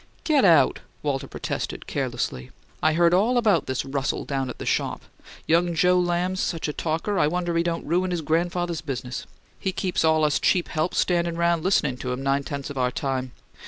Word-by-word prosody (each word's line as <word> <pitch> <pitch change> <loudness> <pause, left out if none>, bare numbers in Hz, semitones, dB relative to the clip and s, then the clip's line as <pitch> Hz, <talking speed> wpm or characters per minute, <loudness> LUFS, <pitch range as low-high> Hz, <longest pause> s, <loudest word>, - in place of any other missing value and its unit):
"Get 300 -4 +3
out!" 165 -5 +5 0.2
Walter 140 -2 -1
protested, - - -4
carelessly. 65 0 -3 0.3
"I 155 - +3
heard 170 +1 +4
all 220 +7 +3
about 210 - +3
this 130 -1 -2
Russell 135 0 -2
down 135 -2 -2
at - - -7
the - - -7
shop. - - -1 0.4
Young 170 +1 +2
Joe 180 +2 +4
Lamb's 180 +1 0
such 165 -2 -1
a 150 - -3
talker 165 +7 -1
I - - +4
wonder 175 +1 -1
he 165 - +3
don't 170 0 -2
ruin 180 +4 +1
his 175 -2 -1
grandfather's 170 +1 -1
business; 130 -4 -5 0.3
he 190 - -1
keeps 185 -2 -1
all 160 -1 +3
us 150 - +2
cheap 180 -2 +2
help 155 +3 -1
standin' 170 -1 +1
round 170 -1 +2
listening 150 -9 +2
to 125 0 -4
him 125 +2 -3
nine 135 +1 +2
tenths 140 0 -5
of 140 - -5
our 125 0 +2
time. 130 -1 -3
165 Hz, 195 wpm, -24 LUFS, 140-175 Hz, 0.4 s, out